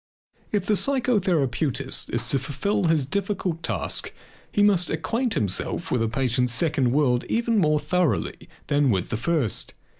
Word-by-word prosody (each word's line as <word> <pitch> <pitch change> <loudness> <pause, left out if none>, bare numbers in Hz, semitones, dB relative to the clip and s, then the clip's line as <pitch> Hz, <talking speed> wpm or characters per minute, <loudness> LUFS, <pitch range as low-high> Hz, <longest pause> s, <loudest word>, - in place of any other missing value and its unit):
If 205 -3 0
the 210 - +2
psychotherapeutist 175 - 0
is 115 0 -1
to 135 - +1
fulfill 200 +9 -1
his 160 -4 +2
difficult 190 0 -2
task - - -2 0.4
he 205 - +2
must 195 -4 +3
acquaint 230 - -1
himself 100 -4 -1
with 125 - +1
the 115 - +1
patient's 125 0 +1
second 135 -1 +1
world 125 -3 +2
even 230 -1 +1
more 155 -4 +3
thoroughly 170 +2 -1 0.2
than 145 -1 +2
with 95 -5 0
the 110 - 0
first. 140 - -1
155 Hz, 150 wpm, -24 LUFS, 130-200 Hz, 0.4 s, must